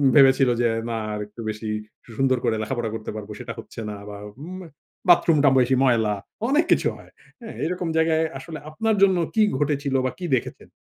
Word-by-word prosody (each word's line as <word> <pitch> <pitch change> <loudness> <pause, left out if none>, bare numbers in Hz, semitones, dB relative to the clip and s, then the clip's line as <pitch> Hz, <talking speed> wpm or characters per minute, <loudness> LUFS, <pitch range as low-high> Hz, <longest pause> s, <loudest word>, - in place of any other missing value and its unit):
ভেবেছিল 135 -2 +6
যে 120 - +3 0.2
না 115 - -2 0.2
আর 105 - -3
একটু 105 +3 -11
বেশি 110 +1 -5 0.5
সুন্দর 130 -1 +3
করে 110 - +1
লেখাপড়া 120 0 -2
করতে 110 - -5
পারব 105 -2 -7
সেটা - - -6
হচ্ছে - - -10
না 105 - -5
বা 105 - -7 0.4
ম - - -8 0.5
বাথরুমটা 155 -4 +6
বেশি 130 +1 +3
ময়লা 115 -5 +3 0.4
অনেক 300 +4 +3
কিছু - - +4
হয়। - - -16 0.5
এরকম 180 +1 -2
জায়গায় 160 0 +3
আসলে 160 -2 -8
আপনার 220 +8 0
জন্য 190 -2 +5 0.2
কি 220 - +4 0.2
ঘটেছিল 145 -2 0
বা 130 - 0
কি 180 - -4
দেখেছেন? 120 - -5
135 Hz, 175 wpm, -24 LUFS, 115-160 Hz, 0.5 s, ভেবেছিল